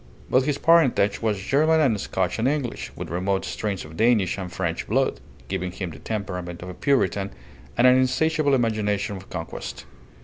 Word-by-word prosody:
But 130 +1 +4
his 145 -1 0
parentage 150 -12 +4
was 110 -3 0
German 155 +10 +3
and 120 -10 +2
Scotch 95 +2 -1
and 115 - +2
English, 140 -4 -2
with - - -6
remote 95 +3 0
strains 100 -3 -3
of 75 +1 -11
Danish 110 -5 +3
and 90 -2 -5
French 85 -2 -3
blood, - - +1 0.3
giving 90 -1 -3
him 95 -1 -5
the 75 - -11
temperament 90 -5 -5
of 90 - -7
a - - -6
Puritan 100 -5 +1 0.5
and 120 - +4
an 125 0 +7
insatiable 145 +3 +2
imagination 105 -4 0
of 95 0 -10
conquest. 80 -3 -6
105 Hz, 175 wpm, -24 LUFS, 95-130 Hz, 0.5 s, an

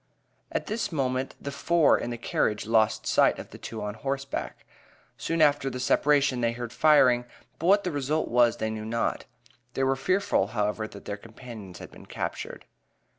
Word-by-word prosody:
At - - -2
this 220 +1 -2
moment 130 -3 -1
the 140 - -5
four 160 +3 +3
in - - -3
the 120 - -4
carriage 105 -2 -1
lost 110 -1 +2
sight - - +3
of - - -9
the - - -11
two 110 -2 -6
on 105 0 -3
horseback. 135 +4 -4 0.5
Soon 165 -1 +1
after 145 -2 +3
the 125 -1 -6
separation 140 -1 +2
they 115 0 +1
heard 120 0 -6
firing, 130 -6 +5 0.4
but 165 - -1
what 200 +2 +5
the 180 - -2
result 145 +2 -1
was, 120 -1 +3
they 110 0 -2
knew 110 -1 -5
not. 115 +2 -2 0.5
They 135 - 0
were 135 0 +2
fearful, 185 - +1
however, 105 +1 0
that 100 -2 -12
their 105 - -4
companions 110 -4 -11
had - - -10
been - - -14
captured. - - -5
125 Hz, 180 wpm, -27 LUFS, 110-145 Hz, 0.5 s, firing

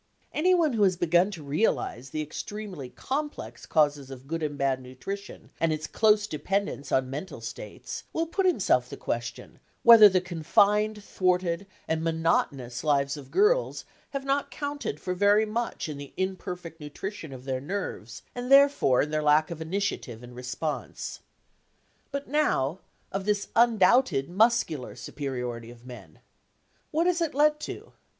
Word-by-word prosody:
Anyone 335 -3 +3
who 220 - 0
has 190 -3 +4
begun 175 +2 +3
to 175 -7 -8
realise 140 - -1
the 155 +3 -3
extremely 180 -2 -6
complex 295 - -5
causes 145 -3 +2
of 135 -1 -10
good 165 +3 -3
and 145 -2 -2
bad 135 -1 0
nutrition 195 +11 -8
and 165 -1 +2
its 155 0 -2
close 210 +4 +3
dependence 185 -3 -2
on 130 0 +1
mental 150 +8 -6
states - - -7
will 325 - 0
put 375 +3 0
himself 360 - +2
the - - -7
question - - -5 0.2
whether 230 -3 +10
the 185 -1 +3
confined, 205 +5 +2
thwarted, 180 -1 0 0.2
and 160 0 -1
monotonous 150 -6 0
lives 140 -2 +2
of 140 -3 -10
girls 475 - +2 0.2
have 275 -1 -4
not 275 +1 0
counted 285 - -4
for 180 - -3
very 205 +3 +4
much 230 -2 -3
in 150 -2 -6
the 140 -1 -9
imperfect 180 -3 -4
nutrition 160 +2 -6
of 130 -1 -10
their 130 -1 -2
nerves 150 - -5
and 245 +1 -5
therefore 275 - +6
in 150 - -5
their 155 0 0
lack 150 +2 +3
of 165 -1 -6
initiative 160 - -3
and 120 0 -11
response. 125 +5 -4 0.9
But 280 0 -4
now, 195 - +1 0.3
of 195 0 -3
this 205 -1 0
undoubted 230 - +4
muscular 205 - +2
superiority 125 -5 -5
of 120 0 -14
men. 110 -11 -12 0.7
What 325 +3 +1
has 355 -1 +2
it 320 -5 -1
led 300 +1 +4
to? - - -8
180 Hz, 155 wpm, -27 LUFS, 140-220 Hz, 0.9 s, whether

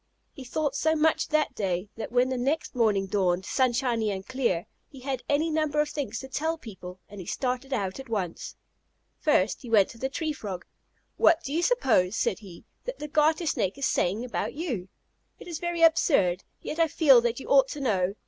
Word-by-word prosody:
He 270 - -9
thought 280 +2 -2
so 315 +2 +2
much 315 +1 +2
that 305 -1 +1
day, 190 0 -2
that 225 - -6
when 250 +1 +3
the 260 - -1
next 285 +6 -1
morning 215 -6 +2
dawned 190 -2 0
sunshiny 240 -3 +1
and 190 -1 -4
clear, 240 -9 -1 0.2
he 270 - -13
had 265 -1 -3
any 310 +3 +2
number 305 -1 0
of 300 0 +2
things 260 -7 -4
to 265 - -8
tell 320 +5 -1
people, 190 - -10
and 205 -1 -9
he 175 - -10
started 255 +1 -2
out 200 -4 -2
at 270 -2 -9
once. 190 -7 -3 0.6
First 220 - +2
he 245 - -9
went 210 -4 +5
to 230 - -12
the 265 - -1
Tree 310 +2 -2
Frog. 195 -10 -6 0.5
"What 335 -6 +4
do 275 - -4
you 330 - +1
suppose," 240 - +2
said 190 - 0
he, 190 -6 -13 0.2
"that - - -4
the 300 - -6
Garter 310 +3 +2
Snake 200 - 0
is 275 - -1
saying 205 +7 0
about 250 - -3
you? 250 - -3 0.5
It - - -12
is 335 -3 -5
very 345 -1 -1
absurd, 200 - +4 0.2
yet 315 - -5
I 330 - +5
feel 280 -6 +6
that 235 +1 -1
you - - -9
ought 270 -1 +6
to 295 - -6
know. 200 -7 0
255 Hz, 205 wpm, -27 LUFS, 200-300 Hz, 0.6 s, feel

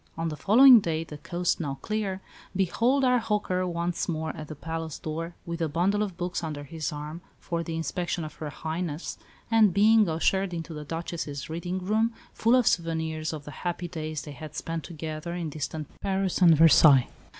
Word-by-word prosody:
On 165 0 -1
the 155 - -4
following 245 - +8
day, 165 -4 -2
the 150 -2 -10
coast 175 +3 -1
now 140 -5 -3
clear, 205 -3 -2 0.3
behold 235 +9 +2
our 250 -1 +4
"hawker" 205 -5 -1
once 170 0 -2
more 160 -1 -2
at 155 -2 -7
the 155 - -7
palace 160 0 -5
door, 165 +2 -5
with 170 0 -5
a 160 - +1
bundle 185 +7 +1
of 195 -5 -3
books 175 -1 -3
under 150 -3 -4
his 155 +2 -4
arm 150 +3 -6 0.2
for 170 -1 -3
the 165 -1 -4
inspection 175 +1 -2
of 155 - -8
Her 150 0 -6
Highness, 160 +1 -4 0.3
and 220 -3 +6
being 215 -1 +5
ushered 180 +3 +1
into 165 0 -5
the 150 -1 -7
Duchess's 160 -2 -5
reading 175 +3 -3
room, 220 +3 +1 0.2
full 230 +3 +3
of 250 -2 +4
souvenirs 160 -3 0
of 150 -2 -7
the 150 - -8
happy 175 0 -2
days 155 -3 -5
they 150 - -8
had 155 +1 -9
spent 165 -1 -4
together 160 +1 -5
in 165 -3 -3
distant 155 0 -4
Paris 190 -1 0
and 165 -3 +7
Versailles. 150 -4 +7
165 Hz, 190 wpm, -27 LUFS, 155-185 Hz, 0.3 s, following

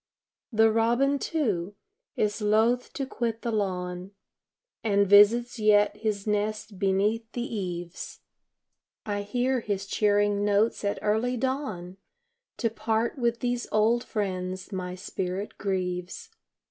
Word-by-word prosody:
The 220 0 +4
robin, 240 +5 +2
too, 205 - -1 0.4
is 210 +1 0
loth 220 +4 +2
to 275 - -3
quit 230 -3 -3
the 235 - -1
lawn 185 -2 -3 0.7
And 200 -2 +3
visits 225 +5 +5
yet 210 -1 +4
his 210 -2 -2
nest 210 -1 -2
beneath 210 +4 +1
the 240 - -2
eaves; 180 -6 -5 0.8
I 205 -1 -2
hear 245 +5 0
his 200 -3 -3
cheering 205 0 +2
notes 205 +2 +2
at 200 0 0
early 220 +4 +1
dawn 225 -9 -3 0.6
To 230 - 0
part 225 +4 -1
with 235 -1 0
these 245 -1 -1
old 225 +3 +3
friends 185 -3 -3
my 180 -2 -4
spirit 185 +2 -4
grieves. 185 - -3
210 Hz, 120 wpm, -27 LUFS, 195-230 Hz, 0.8 s, visits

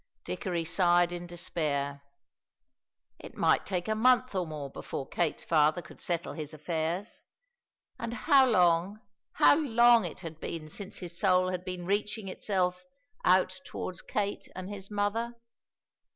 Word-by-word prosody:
Dickory 170 - -3
sighed 175 0 +3
in 175 0 -6
despair. 150 -5 -2 1.2
It - - -11
might - - +3
take 180 -2 -2
a 220 - +1
month 250 +2 +3
or 185 -3 -1
more 150 -3 -5
before 135 - -6
Kate's 170 -3 -1
father 155 +2 +3
could - - -14
settle 170 -1 -2
his 155 -1 -6
affairs, 165 +6 -3 0.8
and 230 -1 -3
how 265 +3 +4
long, 180 -1 +3 0.3
how - - +6
long 240 -5 +5
it 170 - -7
had 160 -3 -8
been 160 -2 -6
since 200 +5 -6
his 175 -2 -7
soul 185 -2 +3
had 180 -1 -3
been 180 -1 -5
reaching 210 +2 -1
itself 180 -2 -1 0.4
out 185 0 +3
towards 180 - -6
Kate 205 -1 -3
and 185 +2 -6
his 195 -1 -7
mother! 215 +3 -1
180 Hz, 145 wpm, -30 LUFS, 170-205 Hz, 1.2 s, how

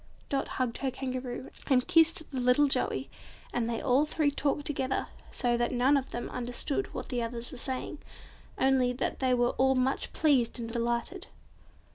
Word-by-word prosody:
Dot 275 - 0
hugged 250 -3 -1
her 270 - 0
Kangaroo, 255 -1 -5 0.2
and 255 -3 +3
kissed 325 0 +4
the 265 - -2
little 250 +4 +4
Joey, 275 - +1 0.5
and 235 -1 0
they 230 - -1
all 265 +2 +3
three 300 -1 +1
talked 285 0 -1
together, 265 -2 -1 0.2
so 240 -1 0
that 240 0 0
none 255 +3 +3
of 270 -2 0
them 240 - -4
understood 250 +9 -2
what - - -6
the 245 -2 -1
others 235 +1 -4
were 260 - -8
saying, 260 +3 -3 0.6
only 260 -2 +3
that 250 - -2
they 255 -1 +3
were 245 0 +2
all 265 0 +4
much 260 +1 0
pleased 265 -7 +2
and 230 - -4
delighted. 235 0 -2
255 Hz, 175 wpm, -30 LUFS, 245-275 Hz, 0.6 s, kissed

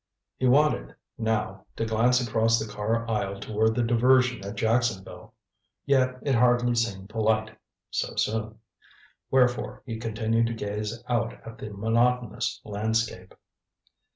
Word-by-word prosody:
He 130 - +2
wanted, 150 +4 +2 0.2
now, 105 -4 -2
to 115 - -2
glance 115 +3 +3
across 115 +1 +3
the 110 - -3
car 110 +3 -2
aisle 100 -3 -2
toward 110 +2 0
the 120 - +1
diversion 125 0 +3
at 100 +2 -6
Jacksonville. 115 -3 -1 0.5
Yet 130 -2 +2
it 140 - +1
hardly 120 0 +3
seemed 100 -5 -2
polite 110 0 0 0.4
so - - -2
soon. 110 0 -1 0.7
Wherefore 125 -2 +1
he 115 -3 -5
continued 115 0 0
to 115 - -3
gaze 105 +2 -4
out 120 -1 0
at 115 0 -10
the 110 - -6
monotonous 115 +3 0
landscape. 110 -2 -2
115 Hz, 130 wpm, -26 LUFS, 110-120 Hz, 0.7 s, glance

